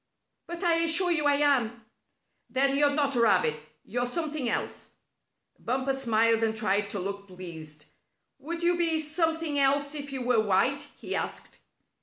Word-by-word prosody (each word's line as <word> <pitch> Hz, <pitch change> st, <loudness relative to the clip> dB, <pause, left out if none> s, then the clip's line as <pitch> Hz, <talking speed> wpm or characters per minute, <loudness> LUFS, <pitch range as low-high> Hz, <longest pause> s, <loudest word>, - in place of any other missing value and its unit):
"But 345 Hz, +2 st, -6 dB
I 340 Hz, -2 st, +4 dB
assure 335 Hz, +2 st, +3 dB
you 300 Hz, -3 st, +1 dB
I 285 Hz, -, +4 dB
am." 245 Hz, -6 st, +1 dB, 0.6 s
"Then 275 Hz, +1 st, +1 dB
you're 290 Hz, +1 st, +4 dB
not 285 Hz, -1 st, 0 dB
a 240 Hz, -, +2 dB
rabbit. 180 Hz, -9 st, +2 dB, 0.2 s
You're 245 Hz, +3 st, -2 dB
something 305 Hz, -2 st, -2 dB
else." -, -, -4 dB, 0.7 s
Bumper 260 Hz, +2 st, -1 dB
smiled 230 Hz, -3 st, +2 dB
and 220 Hz, -1 st, 0 dB
tried 205 Hz, -1 st, 0 dB
to 200 Hz, -, -4 dB
look 200 Hz, +2 st, -5 dB
pleased. 160 Hz, -5 st, -10 dB, 0.5 s
"Would 335 Hz, +3 st, -5 dB
you 350 Hz, +1 st, +3 dB
be 330 Hz, -2 st, +3 dB
something 320 Hz, -1 st, 0 dB
else 280 Hz, +1 st, +2 dB
if 285 Hz, -2 st, -6 dB
you 265 Hz, -2 st, -4 dB
were 245 Hz, -2 st, +2 dB
white?" 220 Hz, +8 st, +1 dB
he -, -, -4 dB
asked. -, -, -5 dB
270 Hz, 160 wpm, -27 LUFS, 220-305 Hz, 0.7 s, I